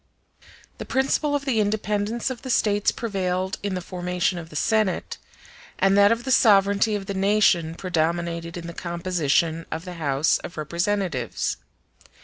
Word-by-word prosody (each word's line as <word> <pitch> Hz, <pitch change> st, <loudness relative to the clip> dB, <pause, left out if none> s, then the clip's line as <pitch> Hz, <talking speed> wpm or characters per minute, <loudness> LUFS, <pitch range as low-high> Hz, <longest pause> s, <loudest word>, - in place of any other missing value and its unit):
The -, -, -5 dB
principle 275 Hz, +2 st, +1 dB
of 280 Hz, -1 st, -2 dB
the 250 Hz, -5 st, +1 dB
independence 210 Hz, +3 st, -1 dB
of 245 Hz, -, -7 dB
the 260 Hz, -, -7 dB
States 205 Hz, -4 st, +2 dB
prevailed 190 Hz, -4 st, -2 dB
in 200 Hz, -2 st, -2 dB
the 180 Hz, -, -3 dB
formation 180 Hz, -1 st, -1 dB
of 165 Hz, -1 st, -10 dB
the 150 Hz, -, -13 dB
Senate, 215 Hz, +4 st, 0 dB, 0.6 s
and 195 Hz, 0 st, +3 dB
that 200 Hz, +1 st, +6 dB
of 230 Hz, +1 st, 0 dB
the 265 Hz, -, -2 dB
sovereignty 205 Hz, -2 st, +4 dB
of 200 Hz, -1 st, -4 dB
the 200 Hz, -, -4 dB
nation 190 Hz, -4 st, +2 dB
predominated 170 Hz, -1 st, -2 dB
in 170 Hz, -, -7 dB
the 170 Hz, -, -6 dB
composition 170 Hz, -2 st, -1 dB
of 160 Hz, +2 st, -4 dB
the 180 Hz, -, -6 dB
House 140 Hz, +1 st, +2 dB
of 170 Hz, -, -9 dB
Representatives. 170 Hz, -, -2 dB
190 Hz, 155 wpm, -24 LUFS, 170-210 Hz, 0.6 s, that